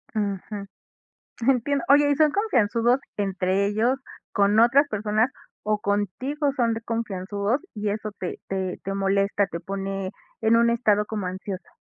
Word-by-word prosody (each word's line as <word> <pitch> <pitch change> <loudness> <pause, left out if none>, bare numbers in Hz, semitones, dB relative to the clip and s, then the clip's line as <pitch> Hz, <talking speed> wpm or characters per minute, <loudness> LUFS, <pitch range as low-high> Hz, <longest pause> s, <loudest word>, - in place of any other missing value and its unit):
Ujú. 200 0 -3 0.8
Entiendo. 270 +2 +1
Oye, 290 +1 +6
¿y 285 - +2
son 305 0 +4
confianzudos 245 - +2 0.2
entre 195 -1 0
ellos, 225 +6 +1 0.3
con 205 +1 +3
otras 270 +5 +5
personas, 215 +2 +1 0.3
o 210 0 0
contigo 230 - -1
son 230 -2 +2
de 225 - -4
confianzudos 210 +1 -2
y 210 -1 -2
eso 215 +1 -3
te 180 - -4
te 190 -1 -2
te 195 - -3
molesta, 195 +1 +1
te 170 - -6
pone 195 0 -4 0.3
en 225 +1 +4
un 235 0 +4
estado 210 -3 +2
como 210 -4 -3
ansiosa? 185 0 -6
210 Hz, 145 wpm, -25 LUFS, 195-235 Hz, 0.8 s, Oye